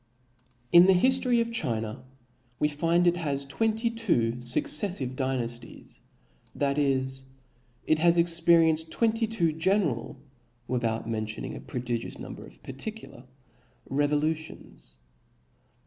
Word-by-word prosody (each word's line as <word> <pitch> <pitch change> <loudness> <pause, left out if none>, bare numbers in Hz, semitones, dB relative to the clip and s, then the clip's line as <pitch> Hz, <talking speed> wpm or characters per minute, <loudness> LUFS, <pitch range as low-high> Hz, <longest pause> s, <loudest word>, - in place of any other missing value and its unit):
TN 175 +1 +8
the 190 - +6
hiftory 255 +3 +3
of 230 0 -3
China 115 - -2 0.5
we 150 - +2
find 165 +4 +1
it 175 0 +3
has 140 -5 -2
had 135 - -11
twenty 225 +1 0
•*• - - -13
two 170 - +1
fucceflive 130 +4 +1
Dynafties, 120 -3 -5 0.6
that 140 0 0
is, 135 -1 -1 0.6
it 155 - +2
has 170 +1 +4
experi 170 -1 +5
enced 160 +1 -3
twenty 225 +2 0
two 170 -8 0
general, 160 - 0 0.5
without 115 -3 -2
mentioning 110 -1 -4
a - - -8
prodigious 120 -2 -5
number - - -9
of - - -16
particular, 135 - -8 0.7
revolutions. 150 - -2
150 Hz, 120 wpm, -27 LUFS, 125-175 Hz, 0.7 s, TN